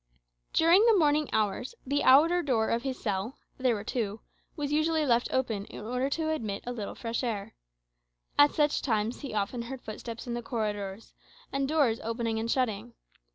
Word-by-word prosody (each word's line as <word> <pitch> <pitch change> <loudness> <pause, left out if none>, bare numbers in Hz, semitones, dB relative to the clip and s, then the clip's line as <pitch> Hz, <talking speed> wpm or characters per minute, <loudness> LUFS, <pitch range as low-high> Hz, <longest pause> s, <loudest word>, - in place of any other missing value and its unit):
During 340 +6 +5
the 450 -3 +6
morning 300 -3 +3
hours 215 - -1
the 285 +2 0
outer 325 +7 +6
door 235 -8 +1
of 230 - +1
his 265 0 -4
cell 205 +4 -2 0.2
(there 255 -3 +2
were 205 - -5
two) 215 -2 -3 0.3
was 290 -3 -3
usually 310 +1 +2
left 240 -2 +3
open, 225 -6 -1
in 210 - -9
order 250 +4 -1
to 315 +2 -1
admit 215 -10 -3
a 245 - -3
little 220 -5 -5
fresh 230 +1 -3
air. 215 -5 -3 0.8
At 290 0 +5
such 295 -1 +2
times 225 -2 0
he 275 -6 -6
often 210 +4 -1
heard 245 +2 -7
footsteps 225 +1 -7
in 240 - -4
the 240 - -3
corridors, 210 -4 -4 0.4
and 275 0 0
doors 280 -8 +2
opening 230 0 -1
and 225 +1 -3
shutting. 235 -2 -1
240 Hz, 180 wpm, -29 LUFS, 220-285 Hz, 0.8 s, the